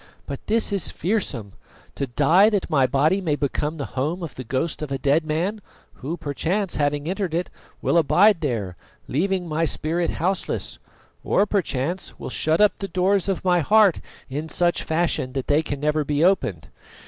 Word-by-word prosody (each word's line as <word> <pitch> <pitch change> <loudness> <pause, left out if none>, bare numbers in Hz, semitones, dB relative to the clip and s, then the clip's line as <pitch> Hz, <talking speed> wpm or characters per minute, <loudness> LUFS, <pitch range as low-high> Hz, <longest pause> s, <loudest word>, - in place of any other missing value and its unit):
But 140 - -7
this 220 -1 +2
is 195 -4 +1
fearsome, 145 - -2 0.4
to 140 - -3
die 160 - +4
that 200 -5 -2
my 135 -4 +4
body 155 +9 +2
may 160 -5 0
become 150 +2 -2
the 140 - -3
home 155 +7 -2
of 160 - -6
the 130 - -7
ghost 135 +8 -2
of 150 -2 -5
a 135 - 0
dead 140 +4 +2
man, 180 +8 -1 0.3
who 155 +6 -5
perchance, 175 +7 -2
having 145 0 0
entered 185 -2 -2
it, 175 +1 -2 0.3
will 170 - +3
abide 185 +4 +4
there, 110 - -2 0.3
leaving 185 +5 -1
my 160 +1 -1
spirit 165 +2 -1
houseless, 185 +3 -2 0.4
or 200 - +2
perchance 175 -4 -2
will - - -7
shut 155 +1 +1
up 210 -1 +4
the 195 - -3
doors 190 +2 +1
of 190 -1 -2
my 180 -1 +4
heart 205 +2 +4 0.3
in 150 +4 -5
such 175 +1 +1
fashion 160 -6 -1
that 135 -2 -3
they 145 +2 +3
never 150 +2 0
can - - -18
be 150 +1 +1
opened. 140 - +1
160 Hz, 180 wpm, -23 LUFS, 145-190 Hz, 0.4 s, die